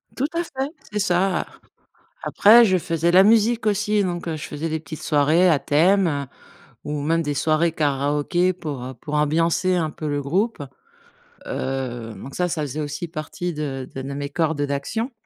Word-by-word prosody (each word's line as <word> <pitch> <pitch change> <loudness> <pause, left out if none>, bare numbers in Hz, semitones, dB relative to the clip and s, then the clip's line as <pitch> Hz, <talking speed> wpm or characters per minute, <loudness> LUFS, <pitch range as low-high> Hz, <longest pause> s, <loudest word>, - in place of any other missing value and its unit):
Tout 275 +3 0
à 340 +1 0
fait, 270 -1 -4 0.2
c'est 210 - -2
ça. 190 -1 +1 0.8
Après, 230 +4 +6
je 185 -2 +3
faisais 165 0 0
la 185 +2 +7
musique 225 +1 +3
aussi, 210 0 +1
donc 175 -2 -3
heu, 160 - -2
je 150 - -7
faisais 155 +2 -4
des 160 0 -2
petites 155 0 -9
soirées 155 +4 +3
à 150 -4 +3
thème, 180 +6 +3
heu, 140 -2 -2 0.6
ou 150 -1 -3
même 165 +3 +1
des 145 -2 -2
soirées 160 +3 +1
karaoké 150 +4 +1
pour, 150 -8 -6
heu, 130 +1 -6
pour 150 +5 -9
ambiancer 165 +4 +2
un 160 -3 0
peu 155 - -6
le 145 0 -1
groupe, 195 - 0 0.9
heu, 125 -4 -4
donc 135 - -10
ça, 180 0 +1
ça 165 -2 -2
faisait 145 +2 -4
aussi 150 +4 -4
partie 165 +3 -5
de 135 -4 -4
de 135 - -5
de 140 +1 -5
mes 140 0 -4
cordes 160 -1 -1
d'action. 145 - -2
160 Hz, 185 wpm, -22 LUFS, 145-185 Hz, 0.9 s, la